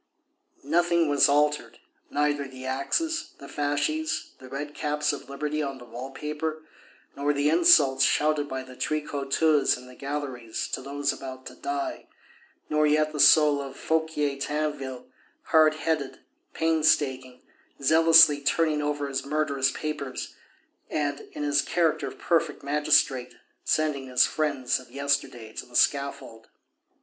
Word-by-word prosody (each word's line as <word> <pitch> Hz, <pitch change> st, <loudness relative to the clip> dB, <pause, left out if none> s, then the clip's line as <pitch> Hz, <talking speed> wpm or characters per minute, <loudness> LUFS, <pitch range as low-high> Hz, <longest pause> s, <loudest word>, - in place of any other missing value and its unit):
Nothing 170 Hz, +2 st, +2 dB
was 145 Hz, 0 st, +4 dB
altered, 145 Hz, -5 st, +1 dB, 0.3 s
neither 145 Hz, -1 st, 0 dB
the 130 Hz, -1 st, -10 dB
axes, 320 Hz, -, -2 dB
the 140 Hz, -, -11 dB
fasces, 145 Hz, +2 st, -2 dB
the 130 Hz, -, -12 dB
red 145 Hz, +2 st, -6 dB
caps 150 Hz, 0 st, -1 dB
of 145 Hz, -, -8 dB
Liberty 150 Hz, +2 st, -3 dB
on 135 Hz, -2 st, -4 dB
the 120 Hz, -, -12 dB
wall 120 Hz, +3 st, -8 dB
paper, 155 Hz, +2 st, -5 dB, 0.5 s
nor 145 Hz, +1 st, 0 dB
the 145 Hz, +1 st, +1 dB
insults 140 Hz, -5 st, +5 dB
shouted 150 Hz, -1 st, +2 dB
by 130 Hz, 0 st, -4 dB
the 130 Hz, 0 st, -13 dB
tricoteuses 150 Hz, 0 st, +1 dB
in 125 Hz, -, -13 dB
the 125 Hz, -, -13 dB
galleries 135 Hz, -5 st, -5 dB
to -, -, -3 dB
those 140 Hz, +1 st, -2 dB
about 130 Hz, -1 st, -9 dB
to -, -, -9 dB
die, 350 Hz, -2 st, -4 dB, 0.6 s
nor 150 Hz, 0 st, +2 dB
yet 155 Hz, +1 st, +2 dB
the 150 Hz, -, -5 dB
soul 150 Hz, -1 st, +6 dB
of 135 Hz, -1 st, -8 dB
Fouquier 160 Hz, -3 st, -1 dB
Tinville, 145 Hz, -3 st, -3 dB, 0.4 s
hard 155 Hz, -1 st, +4 dB
headed, 155 Hz, -3 st, -2 dB, 0.3 s
painstaking, 145 Hz, -6 st, +1 dB, 0.4 s
zealously 160 Hz, 0 st, +6 dB
turning 150 Hz, +1 st, +1 dB
over 145 Hz, -1 st, -2 dB
his 135 Hz, -1 st, -3 dB
murderous 140 Hz, -2 st, 0 dB
papers, 150 Hz, -4 st, -5 dB, 0.6 s
and, 145 Hz, -1 st, -2 dB
in 150 Hz, -, -5 dB
his 145 Hz, -1 st, +2 dB
character 165 Hz, +1 st, 0 dB
of -, -, -9 dB
perfect 165 Hz, -3 st, 0 dB
magistrate, 140 Hz, -3 st, +1 dB, 0.3 s
sending 150 Hz, -4 st, 0 dB
his 125 Hz, -1 st, +4 dB
friends 140 Hz, -6 st, -1 dB
of 130 Hz, -, -15 dB
yesterday 140 Hz, -5 st, -2 dB
to -, -, -7 dB
the 120 Hz, -, -15 dB
scaffold. 140 Hz, -6 st, 0 dB
145 Hz, 140 wpm, -26 LUFS, 135-155 Hz, 0.6 s, soul